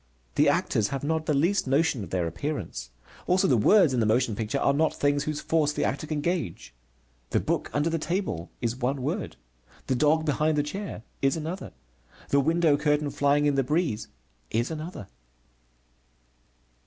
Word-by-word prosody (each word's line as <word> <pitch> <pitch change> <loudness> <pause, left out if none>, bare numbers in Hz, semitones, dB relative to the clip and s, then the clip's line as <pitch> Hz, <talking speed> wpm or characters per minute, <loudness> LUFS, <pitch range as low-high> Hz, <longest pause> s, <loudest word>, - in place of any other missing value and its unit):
The - - +4
actors 105 - +1
have 135 -1 -4
not 160 +1 -1
the 150 - +2
least 170 +4 +2
notion 135 -4 +2
of 90 - -8
their 90 -1 0
appearance. 85 - -4 0.4
Also 185 +1 +3
the 130 - +4
words 160 - +5
in 125 - +1
the 110 - +2
motion 115 0 +2
picture 110 +5 -2
are 140 - +2
not 155 +3 +1
things 145 0 +1
whose 155 -1 -2
force 155 -2 +1
the - - -1
actor 140 +3 -2
can 150 -1 -2
gauge. 170 - -3 0.6
The - - +2
book - - -1
under 145 +2 0
the 165 0 0
table 170 - -2
is 120 0 -1
one 130 +1 -2
word, 175 +9 -3 0.5
the - - 0
dog 155 +4 +2
behind 155 +1 +1
the 145 - +2
chair 190 - -6 0.2
is 135 +3 +2
another, 165 +4 -5 0.6
the 140 - +4
window 160 0 +3
curtain 150 0 +1
flying 145 +1 +2
in 145 - +3
the 135 -1 +2
breeze 150 -5 -1 0.4
is 120 +7 -1
another. 155 - -6
145 Hz, 180 wpm, -27 LUFS, 125-160 Hz, 0.6 s, words